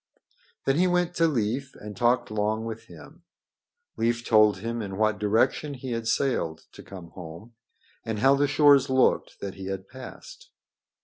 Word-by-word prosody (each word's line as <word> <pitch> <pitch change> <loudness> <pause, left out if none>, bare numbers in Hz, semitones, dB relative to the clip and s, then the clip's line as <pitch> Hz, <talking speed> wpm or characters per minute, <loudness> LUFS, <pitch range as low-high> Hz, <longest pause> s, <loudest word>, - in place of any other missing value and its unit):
Then 135 +1 +2
he 180 +2 +3
went 180 -1 +1
to 165 0 +4
Leif 130 0 -2
and 105 0 -9
talked 120 +3 +1
long 110 +1 -1
with 115 0 -7
him. - - -14 0.8
Leif 120 +1 0
told 110 -3 +5
him 115 +4 -4
in 95 -2 -6
what 110 -2 +1
direction 110 +7 +1
he 130 0 -7
had 115 -1 -3
sailed 85 - -1
to - - -12
come 90 -4 -11
home, 90 +6 -11 0.5
and 110 -1 -3
how 135 +6 +4
the 145 +1 +2
shores 145 -1 +5
looked 130 0 +1
that 100 -1 -5
he 95 -1 -8
had 95 0 -5
passed. - - -12
115 Hz, 170 wpm, -26 LUFS, 105-135 Hz, 0.8 s, told